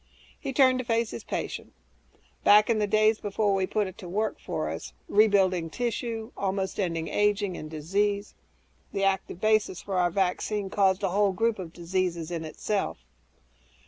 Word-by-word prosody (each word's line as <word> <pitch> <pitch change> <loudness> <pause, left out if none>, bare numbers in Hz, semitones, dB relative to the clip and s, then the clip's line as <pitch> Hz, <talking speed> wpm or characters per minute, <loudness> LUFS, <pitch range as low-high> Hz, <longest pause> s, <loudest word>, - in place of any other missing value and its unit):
He 275 - -4
turned 260 -1 +4
to - - -1
face 230 -1 0
his - - -7
patient, - - -4 0.7
"Back 210 +2 +6
in 220 - +2
the 210 - +1
days 215 +1 +3
before 205 0 0
we 190 -1 +1
put 210 +1 0
it 190 +1 -9
to 180 -5 -8
work 215 +4 -1
for - - -3
us - - -6
rebuilding 195 -5 +3
tissue, 230 +1 -3
almost 195 0 -2
ending 165 -4 -1
aging 205 -2 +1
and 155 - -7
disease 200 +7 -1 0.6
the 195 - -1
active 190 -2 0
basis 215 -3 +2
for 195 -2 -2
our 175 -1 +3
vaccine 195 +2 -1
caused 195 -1 +2
a 195 - +2
whole 200 +1 +2
group 225 +2 0
of 175 -3 -6
diseases, 175 -1 -2
in 165 -2 -3
itself." 195 +6 -2
200 Hz, 170 wpm, -27 LUFS, 185-215 Hz, 0.7 s, Back